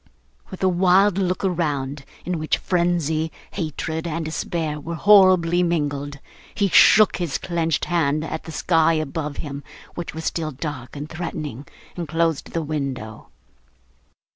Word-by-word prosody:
With 190 - -7
a - - +5
wild 185 +2 +4
look 185 0 0
around, 145 -6 -2 0.2
in 180 -2 -2
which 155 - 0
frenzy, 170 -3 0 0.2
hatred, 160 -1 -3
and 165 0 -3
despair 155 -1 -3
were 165 +3 -5
horribly 185 -2 +5
mingled, 145 -4 -1 0.4
he 200 -1 +1
shook 215 +3 +6
his 170 -6 -2
clenched 165 -2 -1
hand 155 -3 +1
at 160 0 -5
the 165 - -7
sky 165 0 +2
above 155 -1 -3
him, 145 -2 -6 0.3
which 175 -2 -6
was 160 - -6
still 160 -2 -1
dark 145 -3 -6
and 145 +1 -5
threatening, 155 -5 -6 0.3
and 170 -2 -4
closed 165 -1 0
the 165 - -1
window. 135 -8 -5
160 Hz, 140 wpm, -22 LUFS, 150-175 Hz, 0.4 s, shook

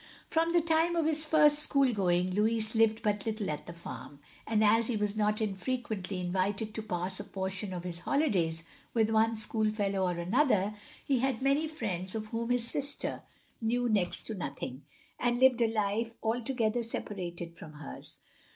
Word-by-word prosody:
From 330 +1 +2
the 345 0 +4
time 325 +1 +2
of 330 -2 +2
his 310 0 +1
first 300 -1 +5
school 275 -4 +3
going 180 -2 +1
Louis 220 +2 +2
lived 225 -1 +3
but 205 -2 +1
little 215 -5 -1
at 150 - -6
the 170 - -7
farm; 170 -3 -9 0.3
and 220 -1 +2
as 225 +2 +4
he 245 - -1
was 210 0 -1
not 210 0 +1
infrequently 205 -2 -2
invited 190 +4 -1
to 220 - -3
pass 185 -2 -3
a - - -4
portion 190 0 -4
of 180 -2 -5
his 175 -1 -4
holidays 175 - +1 0.3
with 220 -1 +3
one 225 +1 +3
schoolfellow 210 -3 0
or 175 -1 -1
another, 210 - +2 0.3
he 270 -3 +2
had 260 -1 0
many 280 +3 +2
friends 195 - -4
of 215 -1 -4
whom 230 +1 -3
his 245 -1 +1
sister 285 +3 -2 0.4
knew 245 +2 +1
next 200 -6 +1
to 220 - -5
nothing, 140 -7 -6 0.3
and 240 0 +1
lived 255 -2 +5
a 225 -1 +3
life 225 +2 -1
altogether 235 0 0
separated 175 -7 -4
from 160 -2 -10
hers. 150 -1 -9
215 Hz, 175 wpm, -31 LUFS, 190-245 Hz, 0.4 s, first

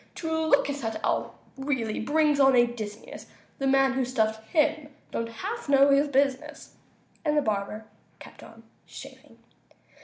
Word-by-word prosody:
To 325 -1 -5 0.2
look 280 -2 +3
at 285 0 -3
that 225 -2 -4
owl - - -1 0.2
really 260 -6 -2
brings 295 +3 +1
on 270 -1 +5
a 240 -1 +6
dizziness; 220 -3 -8 0.3
The 270 - -1
man 270 0 +3
who 265 0 0
stuffed 220 -3 -1
him 310 -2 +1 0.2
don't 230 0 -3
half 395 - -6
know 280 0 +5
his 280 +2 +3
business!" 275 -1 -1 0.5
And 300 -1 +1
the - - +4
barber 215 +1 -3 0.3
kept - - -14
on - - -15 0.2
shaving. - - -13
270 Hz, 155 wpm, -26 LUFS, 230-290 Hz, 0.5 s, a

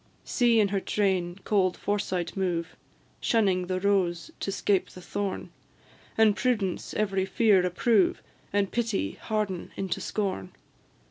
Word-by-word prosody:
See 235 -2 +3
in 205 -2 +3
her 195 0 0
train 190 -3 0
cold 190 -3 +2
Foresight 190 -4 -2
move, 175 -3 -2 0.4
Shunning 190 -6 +2
the 185 0 -1
rose 190 - +1
to 195 - -2
'scape 195 0 +1
the - - -12
thorn; 195 +2 -4 0.7
And 220 -2 +5
Prudence 220 -8 -1
every 195 -3 0
fear 200 -2 +4
approve, 190 +3 +2 0.3
And 200 -1 +1
Pity 225 - 0
harden 210 -5 -3
into 195 -2 -2
scorn! 190 - -3
195 Hz, 130 wpm, -27 LUFS, 185-210 Hz, 0.7 s, And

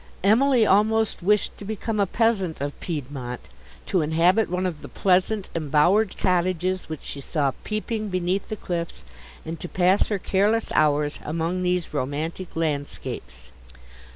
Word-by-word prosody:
—Emily 235 +3 +5
almost 215 +2 +3
wished 210 +3 +2
to - - -8
become 215 +1 -3
a 200 - +3
peasant 200 -6 +1
of 140 +1 -3
Piedmont, 135 -6 -5 0.4
to 185 - +1
inhabit 170 +7 +3
one 180 +1 -1
of 170 -5 -3
the - - -8
pleasant 190 +2 +1
embowered 170 +7 +2
cottages 185 0 0
which 155 -2 -6
she 140 - -6
saw 140 -1 0
peeping 215 0 -3
beneath 185 +1 -1
the 215 - -2
cliffs, 170 -4 -4 0.4
and 160 0 -5
to 175 - -6
pass 185 +2 +3
her 210 - 0
careless 205 +4 +1
hours 150 -1 +2
among 165 +4 -2
these 180 -3 -1
romantic 150 +6 -3
landscapes. 145 - -4
180 Hz, 145 wpm, -24 LUFS, 155-205 Hz, 0.4 s, Emily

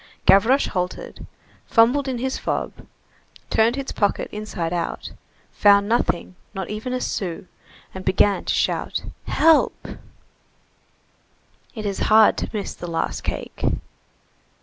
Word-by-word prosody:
Gavroche 235 +8 +5
halted, 180 -1 -4 0.4
fumbled 245 +5 +4
in 260 -2 -2
his 260 +2 -2
fob, - - -2 0.8
turned 225 +2 +3
his 275 -1 -4
pocket 205 -1 0
inside 200 -5 -4
out, 170 -1 -3 0.4
found 200 0 +4
nothing, 215 -5 0 0.2
not 190 0 -4
even 215 +4 -4
a 255 - -1
sou, 185 -6 -3 0.5
and 190 - -7
began 195 +2 +2
to - - 0
shout: - - -1 0.2
"Help!" 320 -1 +3 1.9
It 215 -2 -5
is 200 -1 -2
hard 220 0 +6
to - - -3
miss 210 -3 -4
the 175 - -8
last 165 -1 -2
cake. - - -6
210 Hz, 125 wpm, -22 LUFS, 190-240 Hz, 1.9 s, hard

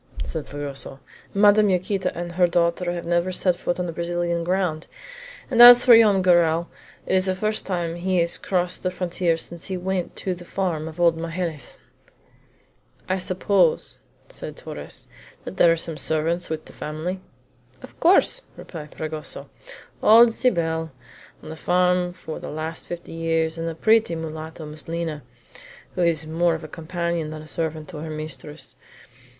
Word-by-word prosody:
said 160 -3 -5
Fragoso. 140 -1 -6 0.3
"Madame 205 +1 +5
Yaquita 185 +1 0
and 175 0 -4
her 175 +1 +3
daughter 175 +1 +1
have 175 -1 -5
never 175 +2 +1
set 180 -1 +1
foot 175 0 -3
on 175 -1 -2
Brazilian 170 0 -2
ground; 180 -3 -1 0.6
and 240 -2 +5
as 245 0 +11
for 245 -2 +9
Joam 210 -4 +5
Garral, 170 -2 +3 0.4
it - - -1
is 185 0 +3
the 185 - +1
first 215 +3 -2
time 175 -3 -2
he 185 +1 0
has 170 0 +1
crossed 180 -1 -1
the 185 - 0
frontier 180 -2 -1
since 170 0 -5
he 190 -2 -3
went 185 0 -3
to 185 - -2
the 175 0 -10
farm 175 -4 -2
of 160 +1 -9
old 170 -1 +3
Magalhaës." 165 -2 -4 1.3
"I 185 0 0
suppose," 185 -1 +1 0.3
asked - - -6
Torres, - - -9 0.4
"that - - -8
there 170 - +6
are 165 - +2
some 165 -1 -4
servants 160 +3 0
with 160 -1 -4
the - - -14
family?" 160 +5 -5 0.6
"Of - - -13
course," 385 +8 +4 0.2
replied 150 -4 -9
Fragoso 155 -1 -6 0.5
"old 230 +2 +7
Cybele, 165 -10 0 0.5
on - - -9
the - - -6
farm 180 +1 +2
for 160 -3 -8
the - - -7
last 155 +2 -5
fifty 175 -1 -7
years, 165 -1 0
and 165 0 -3
a 165 - -6
pretty 220 0 +3
mulatto, 160 0 -6
Miss 150 +1 -9
Lina, 165 -2 -3 0.7
who 180 - -2
is 165 -2 +2
more 165 +1 +1
of 160 - -7
a - - -6
companion 170 0 -3
than 155 0 -7
a - - -13
servant 160 -1 -3
to 170 - -8
her 160 +2 -6
mistress. 155 0 -6
170 Hz, 165 wpm, -23 LUFS, 160-185 Hz, 1.3 s, as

